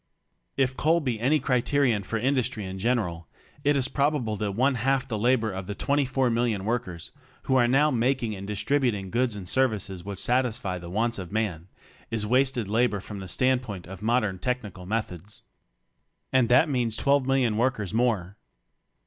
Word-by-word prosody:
H 130 -1 +1
coal 165 +2 +3
be 125 -8 -2
any 140 +7 +3
criterion 125 -3 +1
for 115 +4 -3
industry 125 -3 0
in 95 0 -6
general, 95 -8 -1 0.4
it 145 0 +3
is 130 -1 +2
probable 140 -6 0
that 100 -1 -2
one 130 +6 +2
half 135 +2 0
the 115 - -3
labor 115 -1 +2
of 95 -1 -6
the 100 - -4
twenty 140 +3 +1
four 130 -1 +1
million 115 -4 0
workers 110 -8 -3 0.3
who 130 - +1
are 120 -2 +4
now 145 +5 +3
making 120 -2 0
and 100 0 -8
distributing 105 -2 0
goods 120 -2 +1
and 95 -3 -7
services 105 -7 0
which 100 0 -6
satisfy 115 -3 0
the 85 0 -9
wants 115 +4 0
of 90 -1 -7
man, 100 -6 -2 0.4
is 110 -2 -1
wasted 125 -1 +1
labor 110 0 +1
from 100 +1 -8
the 95 - -7
standpoint 125 -4 0
of 95 +1 -10
modern 110 -4 +1
technical 105 -8 -4
methods. 105 -2 -4 0.9
And 130 -3 +3
that 125 +6 +5
means 120 -6 0
twelve 140 +2 +2
million 130 -5 +2
workers 110 -4 0
more. 110 -5 0
115 Hz, 175 wpm, -26 LUFS, 100-130 Hz, 0.9 s, that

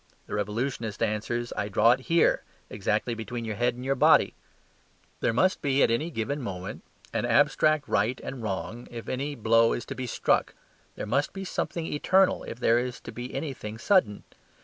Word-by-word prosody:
the - - -9
Revolutionist 110 +2 -2
answers, 115 +2 -2
"I 100 0 -2
draw 105 +3 +5
it 125 - +2
HERE: 165 +6 +2 0.3
exactly 105 +3 -1
between 115 +1 -5
your 110 - -3
head 120 +1 +1
and 130 +2 -2
body." - - +5 0.9
There - - +1
must 185 +12 +2
at 140 -3 +3
any 150 +9 0
given 140 +1 -3
moment 95 -5 -6 0.3
be - - +1
an - - -1
abstract 155 -2 +3
right 110 +6 +1
and 130 -2 -6
wrong 110 +3 -4
if 115 -1 -8
any 140 +3 -3
blow 115 0 +4
is - - -4
to - - -5
be 130 -1 -5
struck; - - +1 0.4
there - - -5
must 135 +7 0
be 195 0 -6
something 170 -2 -3
eternal 185 +5 +2
if 115 - -7
there 120 -1 +4
is 125 0 -4
to - - -8
be 120 +1 -7
anything 135 -7 -5
sudden. 150 - +2
120 Hz, 180 wpm, -27 LUFS, 110-140 Hz, 0.9 s, draw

